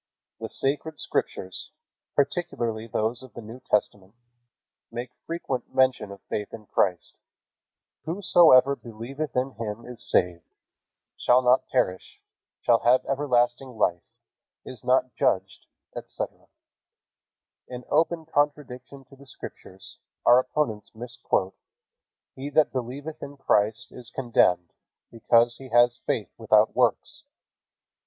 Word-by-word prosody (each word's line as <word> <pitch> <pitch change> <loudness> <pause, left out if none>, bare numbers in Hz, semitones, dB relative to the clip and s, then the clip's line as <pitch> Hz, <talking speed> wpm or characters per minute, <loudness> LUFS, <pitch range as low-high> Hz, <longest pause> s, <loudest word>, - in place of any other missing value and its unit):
The - - -5
Sacred 145 +3 -2
Scriptures, 95 -8 -3 0.5
particularly 120 -7 -1
those 110 +2 -1
of 130 -2 -14
the 120 - -7
New 115 +3 -10
Testament, 105 -3 -1 0.8
make 120 +1 -6 0.2
frequent 140 -7 -4
mention 130 -5 +2
of 100 - -12
faith 105 -1 -4
in 110 - -14
Christ. 90 -3 0 0.9
"Whosoever 160 -6 +5
believeth 125 +5 -7
in 130 +2 0
him 115 -1 -6
is 125 -1 -8
saved, 90 -2 +1 0.6
shall 125 +1 +4
not 125 +1 +3
perish, 95 -8 -1 0.4
shall 115 - +4
have 125 +2 +3
everlasting 130 -2 0
life, 85 -4 +1 0.6
is 125 -4 -9
not 130 0 +2
judged," - - -1 0.3
etc. - - -6 1.2
In 125 0 -8
open 165 +1 +1
contradiction 140 -3 -2
to 135 +2 -17
the 140 +1 -17
Scriptures, 95 -6 -11 0.3
our 125 - +7
opponents 130 -6 -2
misquote, 115 -5 -2 0.8
"He 135 +2 -6
that 150 +1 +3
believeth 135 +5 -5
in 140 0 -8
Christ 110 -4 +1
is 120 -2 -10
condemned, 105 -9 +1 0.4
because 115 +1 +3
he 135 -1 -11
has 120 0 +4
faith 105 - -2
without 110 -1 +3
works." 125 - +1
125 Hz, 120 wpm, -26 LUFS, 110-135 Hz, 1.2 s, our